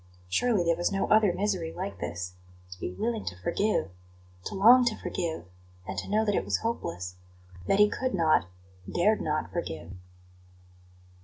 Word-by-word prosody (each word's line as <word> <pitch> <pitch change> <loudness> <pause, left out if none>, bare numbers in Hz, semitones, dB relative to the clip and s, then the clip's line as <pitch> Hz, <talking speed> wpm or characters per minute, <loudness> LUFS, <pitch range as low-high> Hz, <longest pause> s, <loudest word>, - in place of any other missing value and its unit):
Surely 210 - +2
there 170 0 +2
was 175 +1 0
no 195 0 0
other 215 -3 +5
misery 185 -4 -1
like 190 +4 -5
this 90 +1 -4 0.4
to 90 - -9
be 90 - -3
willing 225 - -2
to 90 - -5
forgive, 205 - 0 0.5
to - - -5
long 235 +6 +7
to 235 -3 0
forgive; 165 - -3 0.4
and 95 - -4
to - - -7
know 215 +2 +2
that 205 - +1
it - - +1
was - - 0
hopeless 90 - -3 0.5
that - - +3
he 210 0 +7
could 255 +2 -2
not, 160 - +3 0.4
dared 210 +5 +2
not 155 0 -2
forgive. 85 - -5
185 Hz, 165 wpm, -28 LUFS, -, 0.5 s, long